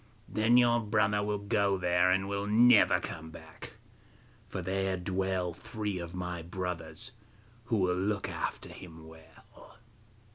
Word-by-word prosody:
Then 110 +3 +3
your 120 -1 +5
brother 105 -1 +1
will 105 0 -1
go 100 -1 +1
there, 90 0 +2
and 95 +1 +1
will 100 0 -2
never 115 +2 +6
come 80 0 -7
back, - - -12 0.8
for - - -4
there 95 +1 -1
dwell 95 -1 -1
three 105 +1 -4
of 85 +1 -7
my 90 -1 -4
brothers 90 +3 -5 0.5
who 115 -2 0
will 90 -2 +2
look 100 +2 -1
after - - -4
him 80 -3 -11
well. 80 0 -17
95 Hz, 140 wpm, -30 LUFS, 90-105 Hz, 0.8 s, never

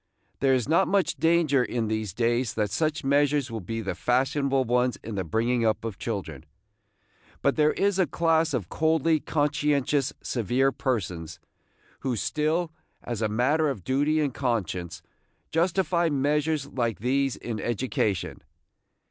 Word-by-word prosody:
There 135 -1 +3
is 125 -1 -1
not 170 +5 +3
much 195 -1 +1
danger 160 -5 +3
in 120 -2 -2
these 110 -2 -2
days 120 +3 0
that 105 -2 0
such 155 +6 -1
measures 140 -1 +2
will 115 - -3
be 115 +5 -4
the 100 -3 -3
fashionable 135 +5 +1
ones 125 +1 +1
in 110 - -6
the 95 -2 -2
bringing 115 +7 0
up 110 0 0
of 110 -4 -5
children. 95 - -4 1.0
But 140 - +3
there 150 -1 +3
is 195 -1 +1
a 185 - +3
class 160 0 +1
of 105 -9 -3
coldly 160 - +2
conscientious, 145 -2 0
severe 125 +4 +1
persons, 90 - -3 0.6
who 130 -3 -2
still, 155 - 0 0.3
as 120 -3 -4
a 110 - +1
matter 145 +8 +2
of 110 -10 -5
duty 145 - +1
and 145 -4 0
conscience, 90 -9 -2 0.5
justify 170 0 +1
measures 150 +1 0
like 120 -5 -2
these 135 +3 0
in 115 -3 -5
education. 115 -4 -2
130 Hz, 150 wpm, -26 LUFS, 115-150 Hz, 1.0 s, There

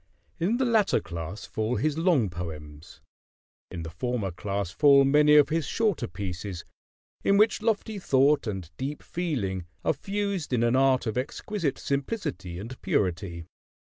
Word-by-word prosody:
In 200 +8 +1
the 260 - +1
latter 220 -4 +3
class 85 +4 -6
fall 110 +3 -2
his 150 +2 0
long 160 - +2
poems; 80 -2 -8 0.7
in 85 - -6
the 80 - -7
former 105 +2 -2
class 100 0 -3
fall 140 - +6
many 150 +2 +5
of 150 -1 +6
his 160 -2 0
shorter 210 - 0
pieces, 95 -3 -6 0.6
in 200 - +4
which 215 +1 +4
lofty 220 -1 -1
thought 140 -4 +3
and 95 -6 -5
deep 140 +3 -4
feeling 105 - -3 0.2
are - - +3
fused 195 -1 -3
in 120 -2 +2
an 120 +1 +3
art 130 -1 +3
of 110 +2 -1
exquisite 155 +4 -3
simplicity 135 - -3
and 115 +7 -8
purity. 85 -2 -1
130 Hz, 150 wpm, -27 LUFS, -, 0.7 s, fall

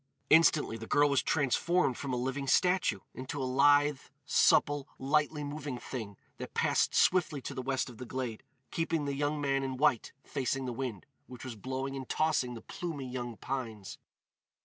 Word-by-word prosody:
Instantly 155 -6 +5
the 115 0 -8
girl 145 0 +4
was 140 - +3
transformed 150 +1 +1
from 140 +2 -5
a - - 0
living 135 +3 -2
statue 180 +7 +2
into 130 +3 -6
a 130 - -1
lithe, 145 +2 +4 0.3
supple, 145 -1 +3
lightly 150 +2 +1
moving 145 -2 -5
thing 110 -6 -6 0.2
that - - -8
passed - - +2
swiftly 170 -5 +3
to - - -6
the 130 - -4
west 135 +1 -1
of 120 -4 -11
the 125 - -6
glade, 125 -4 -4 0.3
keeping 165 -2 -1
the 140 - -1
young 145 +2 -1
man 135 -1 +1
in 130 -1 -3
white 125 -5 +2
facing 135 -1 -2
the 125 - -3
wind, 120 -6 -4 0.2
which 125 -2 -10
was 125 -3 -6
blowing 130 +5 -4
and 130 -2 -7
tossing 150 -6 +1
the 115 - -8
plumy 155 -7 -5
young 120 -2 -5
pines. 115 -7 -5
135 Hz, 175 wpm, -31 LUFS, 125-145 Hz, 0.3 s, Instantly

